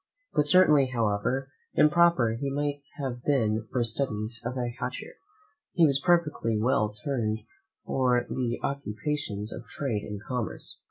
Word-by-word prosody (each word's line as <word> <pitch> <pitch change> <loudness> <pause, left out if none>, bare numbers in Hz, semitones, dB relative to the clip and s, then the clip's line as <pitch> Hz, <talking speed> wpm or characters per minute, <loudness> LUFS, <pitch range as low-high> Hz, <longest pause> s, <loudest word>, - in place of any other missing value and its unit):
But 150 - +2
certainly, 150 -5 +6
however 125 +3 -1 0.2
improper 150 -7 +4
he 135 +5 -3
might 145 +1 -2 0.2
have 130 -4 -4
been 110 -6 +1
for 125 -2 +1
studies 115 -1 -1
of 120 +2 -3
a - - 0 0.2
higher - - -1
nature, - - -8 0.6
he 175 -3 +5
was 140 -2 +3
perfectly 150 -10 +2
well 105 -2 +2
turned 115 -6 0 0.5
for 125 -2 +2
the 120 -2 -2
occupations 115 -4 -3
of - - -9
trade 120 -8 -2
and 105 -1 -6
commerce. 125 -3 -3
130 Hz, 145 wpm, -28 LUFS, 110-145 Hz, 0.6 s, certainly